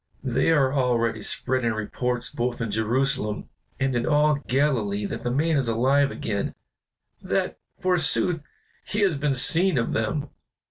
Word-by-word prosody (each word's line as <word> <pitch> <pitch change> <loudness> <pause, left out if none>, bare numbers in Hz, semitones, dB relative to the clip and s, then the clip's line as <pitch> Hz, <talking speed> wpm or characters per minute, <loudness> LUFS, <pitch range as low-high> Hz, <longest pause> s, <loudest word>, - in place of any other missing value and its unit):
"They 130 +2 +1
are 140 -5 +3
already 115 -5 +1
spreading 120 +1 0
reports 125 +3 -3
both 120 0 -2
in 115 -2 -2
Jerusalem 110 +1 -1 0.3
and 130 -1 0
in 120 - 0
all 150 -1 +3
Galilee 120 -7 +1
that - - -5
the 120 - -2
man 155 +5 +1
is 135 -3 0
alive 135 +5 +2
again, 105 -6 -3 0.7
that, - - -2 0.2
forsooth, 175 -4 +2 0.4
he 210 - -2
has 190 -5 +3
been 140 -1 0
seen 165 +6 +4
of 115 - 0
them. 140 +6 -2
130 Hz, 145 wpm, -25 LUFS, 115-145 Hz, 0.7 s, seen